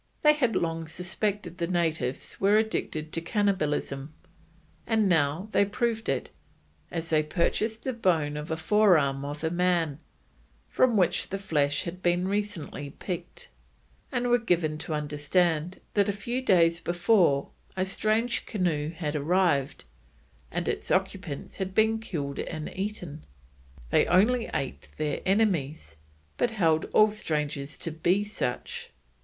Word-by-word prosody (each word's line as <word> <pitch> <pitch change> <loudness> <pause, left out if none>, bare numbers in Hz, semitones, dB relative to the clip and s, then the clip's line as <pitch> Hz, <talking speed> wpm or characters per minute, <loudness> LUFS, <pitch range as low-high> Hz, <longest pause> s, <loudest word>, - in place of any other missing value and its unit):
They 300 0 +7
had 255 -7 +1
long 165 -1 -1
suspected 180 +1 -3
the 170 - 0
natives 160 -7 -1
were 200 +2 +5
addicted 160 -8 -1
to 165 - 0
cannibalism, 160 -7 -1 0.8
and 220 -2 +3
now 165 +2 +2
they - - +4
proved 225 +2 -1
it, 135 - -1 0.6
as 165 0 -4
they 155 -1 +4
purchased 215 +8 -1
the 260 - -1
bone 165 -10 +1
of 150 +1 -5
a 160 - -1
forearm 160 -7 +3
of 145 +2 -6
a 160 - 0
man, 170 -4 +1 0.7
from 245 -4 +3
which 175 -2 +2
the 195 - -2
flesh 145 -7 0
had 180 +1 -6
been 175 +1 +1
recently 200 -8 -3
picked, 175 -2 -6 0.6
and 245 -2 0
were 245 0 +4
given 170 -8 0
to 155 - -3
understand 150 +3 0
that 205 0 +3
a - - +1
few 235 +6 -3
days 170 -7 +4
before 175 -5 +2 0.3
a 185 - +1
strange 215 +5 0
canoe 170 -8 0
had 160 -2 -4
arrived, 150 - +1 0.6
and - - -3
its - - -2
occupants 190 -5 -2
had 190 -1 -4
been 220 +1 +3
killed 145 -10 -4
and 155 -2 -5
eaten. 185 -6 -5 0.7
They - - +4
only 225 +7 +3
ate 135 - -4
their 150 -2 -2
enemies, 160 - 0 0.4
but 240 - +2
held 165 -8 +2
all 215 0 +4
strangers 150 -7 -3
to 165 - -5
be 175 +6 +1
such. 205 -12 -4
175 Hz, 140 wpm, -28 LUFS, 155-205 Hz, 0.8 s, They